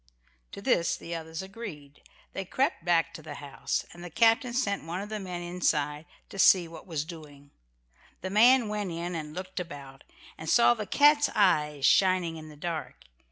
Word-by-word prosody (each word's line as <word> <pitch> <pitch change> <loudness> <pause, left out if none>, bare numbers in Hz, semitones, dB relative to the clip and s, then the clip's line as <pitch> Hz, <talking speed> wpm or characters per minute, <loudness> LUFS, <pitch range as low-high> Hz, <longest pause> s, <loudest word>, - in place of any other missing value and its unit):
To - - -8
this 170 - +2
the 170 - -7
others 160 +1 -5
agreed. 190 -9 -9 0.3
They 195 - -3
crept 260 - -1
back 170 -1 +2
to - - -9
the 150 -1 -8
house, 140 -1 -3
and 175 - -11
the 175 - -7
captain 230 - +3
sent 235 -5 -1
one 170 +3 -4
of 205 +1 -6
the 215 -1 -4
men 180 -3 -5
inside 155 -3 -1 0.2
to 195 - -9
see 180 -2 +6
what 165 +2 -12
was 155 -4 -3
doing. 145 -4 -12 0.7
The 190 - -4
man 240 +3 +5
went 210 -2 -3
in 170 +2 -4
and 155 -2 -6
looked 185 +1 -5
about, 140 -6 -9 0.4
and 160 - -5
saw 240 0 +6
the 215 -3 -6
cat's 290 +5 +5
eyes 150 -8 +2
shining 185 -3 +3
in 155 0 -10
the 150 - -13
dark. 165 +1 -5
175 Hz, 185 wpm, -28 LUFS, 155-200 Hz, 0.7 s, see